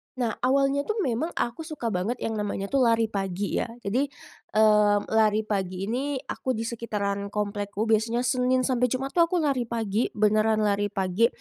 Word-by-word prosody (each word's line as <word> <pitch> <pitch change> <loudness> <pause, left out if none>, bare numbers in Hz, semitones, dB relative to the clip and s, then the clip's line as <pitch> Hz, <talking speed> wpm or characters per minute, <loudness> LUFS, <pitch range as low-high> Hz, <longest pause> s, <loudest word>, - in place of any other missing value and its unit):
Nah, 240 -3 0 0.2
awalnya 275 +1 +2
tuh 430 - -1
memang 260 +6 -1
aku 240 +7 -3
suka 275 -8 -3
banget 205 +6 -2
yang 220 -1 -2
namanya 200 -1 -3
tuh 275 - +2
lari 225 -1 +2
pagi, 195 -1 -2
ya. - - -1 0.2
Jadi, 250 +8 0 0.5
mmm, 210 -1 +4
lari 220 -1 +3
pagi 195 -1 -3
ini 275 +4 -1
aku 260 -2 -3
di 225 - -3
sekitaran 210 -4 -3
komplekku. 205 0 -2
Biasanya 225 +2 +1
Senin 255 0 +2
sampai 250 -1 +2
Jumat 265 +2 -2
tuh 340 -1 +4
aku 345 -1 0
lari 265 -5 0
pagi, 225 -1 -1
beneran 215 +1 +2
lari 205 0 +1
pagi, 195 +3 +1
225 Hz, 175 wpm, -26 LUFS, 205-255 Hz, 0.5 s, mmm